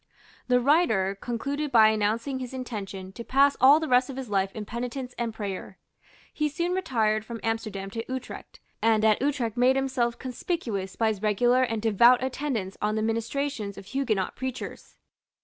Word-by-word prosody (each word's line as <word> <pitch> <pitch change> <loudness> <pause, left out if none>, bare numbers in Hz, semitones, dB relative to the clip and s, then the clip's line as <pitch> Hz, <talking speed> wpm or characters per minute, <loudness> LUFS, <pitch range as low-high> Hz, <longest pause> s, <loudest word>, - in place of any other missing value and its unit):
The 250 -1 +4
writer 240 - +2
concluded 280 +5 -3
by 220 -3 +7
announcing 220 +5 0
his 255 0 -6
intention 195 -7 -6
to 235 - -8
pass 275 +3 +3
all 280 +4 +8
the 320 - -3
rest 250 0 +3
of 270 - -6
his 260 -4 -6
life 195 -1 +1
in 215 -2 -5
penitence 245 +3 -5
and 235 -1 -2
prayer. 200 -3 -6 0.6
He 300 0 0
soon 340 +4 -2
retired 220 - 0
from 230 +1 -7
Amsterdam 215 -4 -3
to 225 +2 -4
Utrecht, 260 -1 -7 0.2
and 220 -1 +3
at 215 +1 +3
Utrecht 260 -6 -1
made 250 +2 +4
himself 260 -3 0
conspicuous 240 - -4
by 225 -1 +2
his 210 -3 -3
regular 240 +4 +3
and 225 -4 -1
devout 235 +3 +5
attendance 255 -8 -3
on 210 +1 0
the 215 - 0
ministrations 230 -1 -2
of - - -9
Huguenot 215 -4 -1
preachers. 260 0 -6
235 Hz, 170 wpm, -27 LUFS, 215-260 Hz, 0.6 s, all